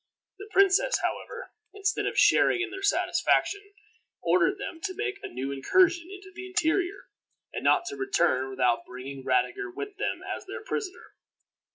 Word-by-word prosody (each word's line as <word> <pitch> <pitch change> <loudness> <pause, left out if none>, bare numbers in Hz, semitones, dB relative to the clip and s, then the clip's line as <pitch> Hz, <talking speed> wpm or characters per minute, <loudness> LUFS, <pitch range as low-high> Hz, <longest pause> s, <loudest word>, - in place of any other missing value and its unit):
The 410 +1 -9
princess, 395 +6 +4
however, 480 +1 -4 0.2
instead 405 +1 0
of - - -3
sharing 365 - +5
in 365 0 -2
their 385 0 -7
satisfaction, 405 0 +2 0.6
ordered 370 +2 +2
them 360 -5 -7
to 375 -2 -3
make 415 0 -3
a - - -5
new 130 +3 -4
incursion 340 - +2
into 385 -1 -11
the 370 +1 -8
interior, 365 +2 0 0.4
and - - -4
not 355 -1 +4
to 410 - -6
return 390 - +1
without 125 -3 +1
bringing 130 +2 -8
Radiger 390 - 0
with 410 +1 -7
them 410 - -2
as - - -6
their 450 - -7
prisoner. 400 -6 -5
375 Hz, 160 wpm, -27 LUFS, 335-405 Hz, 0.6 s, sharing